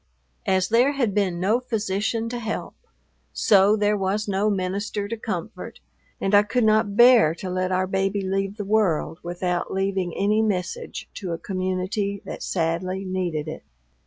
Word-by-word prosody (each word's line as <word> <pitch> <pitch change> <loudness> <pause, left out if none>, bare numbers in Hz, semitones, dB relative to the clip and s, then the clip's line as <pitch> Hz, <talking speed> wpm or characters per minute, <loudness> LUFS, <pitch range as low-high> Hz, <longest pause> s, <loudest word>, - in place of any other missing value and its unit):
As 185 -1 +2
there 245 +5 +4
had 245 -8 0
been 190 -4 0
no 210 +6 +2
physician 225 -1 -2
to 240 0 -4
help, 220 -2 -4 0.6
so 200 0 +4
there 210 0 +2
was 200 +2 -1
no 200 +1 +1
minister 200 +1 -2
to 230 - -3
comfort, 215 -2 -6 0.4
and 195 - -1
I 205 - +8
could 230 +4 0
not 215 -1 +2
bear 240 -9 +7
to 185 +1 -6
let 185 0 -1
our 185 0 +1
baby 195 +1 0
leave 195 +2 -2
the 205 - -4
world 195 -6 +1
without 175 0 -2
leaving 190 -2 -1
any 210 +2 +2
message 215 - -3
to 185 -5 -5
a - - -3
community 190 +2 -2
that - - -7
sadly 185 +3 -2
needed 175 -5 -2
it. 155 - -6
195 Hz, 160 wpm, -24 LUFS, 185-215 Hz, 0.6 s, I